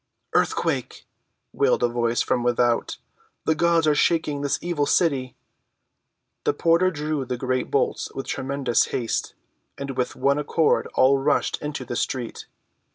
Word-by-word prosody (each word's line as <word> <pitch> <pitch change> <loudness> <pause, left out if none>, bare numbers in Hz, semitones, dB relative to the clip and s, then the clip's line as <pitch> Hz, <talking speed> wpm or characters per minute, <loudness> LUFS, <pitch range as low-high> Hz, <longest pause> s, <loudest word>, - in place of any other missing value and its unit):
"Earthquake!" - - 0 0.5
wailed - - +2
a - - +5
voice 120 0 0
from 125 - 0
without. 120 -1 +1 0.5
"The 160 - +3
gods 170 +1 +2
are 155 - +4
shaking 150 -1 +1
this 145 -1 0
evil 165 -5 -1
city!" 135 -7 +1 1.1
The - - +2
porter 170 +2 +3
drew 150 -3 -2
the 125 -1 -4
great 130 0 -1
bolts - - 0
with - - -4
tremulous 130 -2 0
haste, 115 -3 -3 0.4
and 140 0 -4
with 125 -1 -2
one 140 +1 +2
accord 155 +2 +1
all 135 +1 +4
rushed 145 +2 0
into 150 -3 -4
the 120 - -5
street. 120 -1 -3
140 Hz, 145 wpm, -24 LUFS, 125-155 Hz, 1.1 s, a